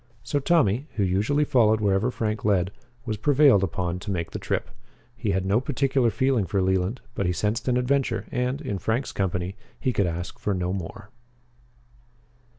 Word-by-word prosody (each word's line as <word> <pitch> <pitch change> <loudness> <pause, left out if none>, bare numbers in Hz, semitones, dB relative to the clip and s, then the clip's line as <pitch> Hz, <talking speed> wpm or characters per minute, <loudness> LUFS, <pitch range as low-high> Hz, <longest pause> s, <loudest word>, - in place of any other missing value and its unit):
So 145 - 0
Tommy, 140 - +2
who 105 - +1
usually 105 +11 +2
followed 110 -5 +4
wherever 100 +2 +2
Frank 110 -3 -2
led, 95 -3 +2 0.3
was 110 -3 -2
prevailed 140 -3 +5
upon 90 -2 -2
to 100 - -7
make 85 -4 -2
the - - -5
trip. - - -2 0.4
He 120 -3 -3
had 95 -1 0
no 100 +5 +2
particular 135 -2 +1
feeling 130 -5 +1
for 100 - 0
Leland, 95 +5 0
but 100 -6 -1
he - - +2
sensed 105 +8 -1
an 125 -1 +3
adventure, 125 -4 0
and, 125 +3 -1
in 105 -10 -3
Frank's 110 +8 -1
company, 95 -1 -2 0.2
he 130 - 0
could 100 -4 +2
ask 85 +1 -5
for 105 - -1
no 90 0 -1
more. 95 +2 -7
105 Hz, 175 wpm, -25 LUFS, 95-125 Hz, 0.4 s, prevailed